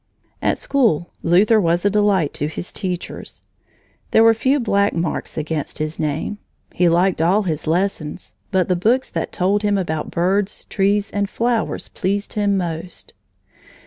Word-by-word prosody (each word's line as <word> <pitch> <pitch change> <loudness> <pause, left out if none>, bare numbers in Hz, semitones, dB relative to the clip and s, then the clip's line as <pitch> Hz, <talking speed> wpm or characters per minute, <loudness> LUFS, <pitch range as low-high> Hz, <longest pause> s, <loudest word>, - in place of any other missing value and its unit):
At - - +1
school, 220 - +1
Luther 210 +6 +4
was 175 +1 +1
a - - +5
delight 200 -7 +2
to 145 - -2
his 160 +3 -6
teachers. 180 -3 -5 0.7
There 220 - +5
were 225 0 +7
few 265 +6 +1
black 200 -4 +1
marks 165 -1 -3
against 155 -1 -3
his 155 +1 -4
name. 155 +7 -2 0.3
He 175 -1 +3
liked 175 0 +2
all 190 +6 +3
his 160 -4 -3
lessons, 170 -2 -2 0.2
but 190 -3 +1
the 180 - +2
books 235 +9 +1
that - - -3
told 200 +2 +1
him 205 -1 +1
about 160 -5 -2
birds, 190 +4 0
trees, 205 +1 +1
and 200 -1 -1
flowers 235 0 -1
pleased 200 +2 -2
him 205 -2 +1
most. 170 -1 -5
190 Hz, 155 wpm, -20 LUFS, 170-205 Hz, 0.7 s, were